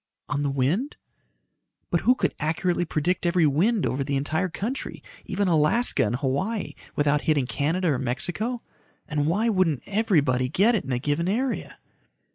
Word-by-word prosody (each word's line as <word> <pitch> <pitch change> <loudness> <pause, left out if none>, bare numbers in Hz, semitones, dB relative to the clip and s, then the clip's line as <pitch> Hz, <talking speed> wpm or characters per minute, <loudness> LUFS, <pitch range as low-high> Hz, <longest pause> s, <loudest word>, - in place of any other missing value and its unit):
"On 145 0 -1
the 145 - 0
wind?" 145 - 0 0.9
"But - - +2
who 250 - +4
could - - 0
accurately 175 +3 0
predict 165 +3 -1
every 170 -1 +3
wind 180 - +2
over 130 +3 -1
the 140 +1 -2
entire 160 +6 -1
country 220 +10 -5 0.2
even 200 0 -1
Alaska 170 +9 +3
and 115 +1 0
Hawaii 150 - -2 0.2
without 145 0 +2
hitting 150 -4 +1
Canada 165 +7 0
or 135 -4 +1
Mexico? 180 - -2 0.4
And 150 -1 -1
why 205 +8 +1
wouldn't 185 - +1
everybody 150 - +1
get 205 - +3
it 215 - -1
in 135 - -4
a 125 - +1
given 145 +6 -1
area?" 240 +3 -2
160 Hz, 160 wpm, -25 LUFS, 140-200 Hz, 0.9 s, who